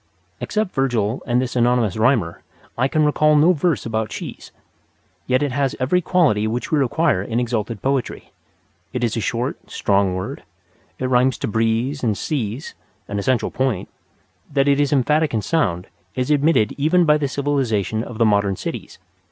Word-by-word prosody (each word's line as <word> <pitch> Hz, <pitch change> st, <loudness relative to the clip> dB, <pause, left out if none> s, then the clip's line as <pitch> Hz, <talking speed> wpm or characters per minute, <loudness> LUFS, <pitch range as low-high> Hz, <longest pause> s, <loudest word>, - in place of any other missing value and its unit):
Except 215 Hz, -3 st, -2 dB
Virgil 120 Hz, -4 st, 0 dB
and 120 Hz, 0 st, +2 dB
this 130 Hz, 0 st, -3 dB
anonymous 120 Hz, -4 st, +2 dB
rhymer, 110 Hz, -6 st, +1 dB, 0.3 s
I 125 Hz, +2 st, +1 dB
can 155 Hz, +2 st, +1 dB
recall 150 Hz, +1 st, +3 dB
no 160 Hz, +5 st, +5 dB
verse 165 Hz, -2 st, 0 dB
about 110 Hz, -1 st, -2 dB
cheese. -, -, -8 dB, 0.8 s
Yet 130 Hz, +2 st, +2 dB
it 145 Hz, -, -1 dB
has 135 Hz, +1 st, 0 dB
every 145 Hz, +8 st, +2 dB
quality 150 Hz, -, +2 dB
which 120 Hz, +3 st, -3 dB
we 155 Hz, -, +3 dB
require 140 Hz, -, +1 dB
in 115 Hz, +4 st, -2 dB
exalted 115 Hz, -3 st, -3 dB
poetry. 135 Hz, -2 st, -2 dB, 0.6 s
It 125 Hz, -1 st, -2 dB
is 115 Hz, -2 st, 0 dB
a -, -, -1 dB
short, 120 Hz, +5 st, -3 dB
strong 100 Hz, -2 st, +1 dB
word; 95 Hz, 0 st, -5 dB, 0.6 s
it 130 Hz, -, -3 dB
rhymes 130 Hz, 0 st, +2 dB
to -, -, -3 dB
"breeze" 115 Hz, +6 st, 0 dB
and 110 Hz, -4 st, +1 dB
"seas" 130 Hz, -3 st, -3 dB, 0.3 s
(an 100 Hz, -, -3 dB
essential 125 Hz, +3 st, 0 dB
point); 130 Hz, -8 st, -1 dB, 0.6 s
that 140 Hz, 0 st, +2 dB
it 140 Hz, 0 st, +3 dB
is 145 Hz, -1 st, +1 dB
emphatic 150 Hz, +1 st, +2 dB
in 110 Hz, -, -1 dB
sound 95 Hz, -, 0 dB, 0.3 s
is 130 Hz, +3 st, -1 dB
admitted 145 Hz, -7 st, +3 dB
even 170 Hz, +5 st, +3 dB
by 150 Hz, -1 st, +4 dB
the 145 Hz, -, 0 dB
civilization 130 Hz, -7 st, -1 dB
of 120 Hz, -2 st, -8 dB
the 115 Hz, -, +3 dB
modern 100 Hz, -2 st, +2 dB
cities. -, -, -6 dB
125 Hz, 170 wpm, -21 LUFS, 110-145 Hz, 0.8 s, no